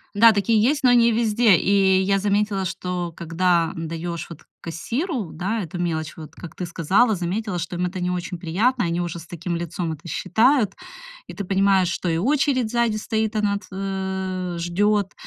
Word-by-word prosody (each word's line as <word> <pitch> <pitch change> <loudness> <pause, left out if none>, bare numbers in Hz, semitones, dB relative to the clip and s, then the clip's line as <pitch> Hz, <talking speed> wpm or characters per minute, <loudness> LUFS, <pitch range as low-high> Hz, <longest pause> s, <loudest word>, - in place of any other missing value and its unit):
Да, 225 +1 +7
такие 210 +2 +2
есть, 280 +4 +1
но 250 - +6
не 235 -1 +5
везде. 225 -2 +4
И 190 +1 +3
я 195 +1 +2
заметила, 205 -1 0
что 180 -2 -4
когда, 170 0 +1
м, 165 -1 -4
даёшь 165 0 -5
вот 165 - -10 0.2
кассиру, 230 - -3
да, 195 +7 -2
эту 175 +2 -7
мелочь, 160 -2 -2
вот 155 -1 -10
как 175 - -10
ты 180 - -4
сказала, 195 +7 +2
заметила, 185 +2 -3
что 175 +1 -4
им 180 - 0
это 180 +1 -4
не 180 0 0
очень 180 0 -4
приятно, 210 +9 0
они 170 +1 -1
уже 170 -1 -4
с 160 - -11
таким 175 +1 -4
лицом 170 0 -3
это 160 +3 -11
считают. 230 +3 +2 0.5
И - - -8
ты 200 - -5
понимаешь, 195 -1 +3
что 175 - -2
и 165 - +1
очередь 260 - +1
сзади 235 -3 +1
стоит, 220 0 -2
она 200 -1 +1
т 205 - -12
а, 190 -2 -3
ждёт, 200 +3 +1
190 Hz, 190 wpm, -23 LUFS, 175-215 Hz, 0.5 s, Да